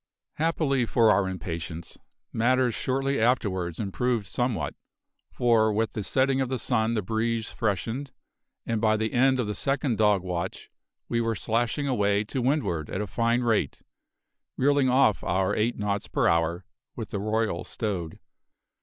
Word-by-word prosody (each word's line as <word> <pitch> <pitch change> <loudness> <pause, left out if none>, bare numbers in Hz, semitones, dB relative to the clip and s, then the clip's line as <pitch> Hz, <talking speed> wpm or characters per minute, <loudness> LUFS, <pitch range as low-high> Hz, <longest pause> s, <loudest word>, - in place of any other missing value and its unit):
Happily 150 -6 +1
for 115 -2 +4
our 95 -1 +2
impatience, 85 -3 -6 0.3
matters 125 +1 +2
shortly 135 +3 -1
afterwards 95 -8 0
improved 115 +2 -1
somewhat, 120 +3 -1 0.6
for 115 -3 +3
with 110 +1 0
the 105 - -4
setting 135 +4 +1
of 130 - -1
the 130 - -1
sun 115 -1 0
the 105 - -1
breeze 110 +2 -1
freshened, 115 - -2 0.6
and 115 -2 -1
by 110 -1 +3
the 110 0 -2
end 130 +1 +3
of 125 - +1
the 105 - -2
second 135 0 -1
dog 105 -4 +3
watch 90 0 -4 0.4
we 115 0 0
were 115 -1 0
slashing 120 +7 -1
away 105 -5 +2
to 125 +5 -3
windward 120 - 0
at - - -3
a 105 - -1
fine 115 +5 +1
rate, 110 - 0 0.7
reeling 140 0 +3
off 125 -5 +3
our 95 +1 +1
eight 115 +3 0
knots 105 -1 -2
per - - +1
hour, 85 +1 +1 0.3
with - - -6
the 100 - -2
royal 110 -3 -1
stowed. 95 -7 -4
110 Hz, 155 wpm, -26 LUFS, 100-125 Hz, 0.7 s, for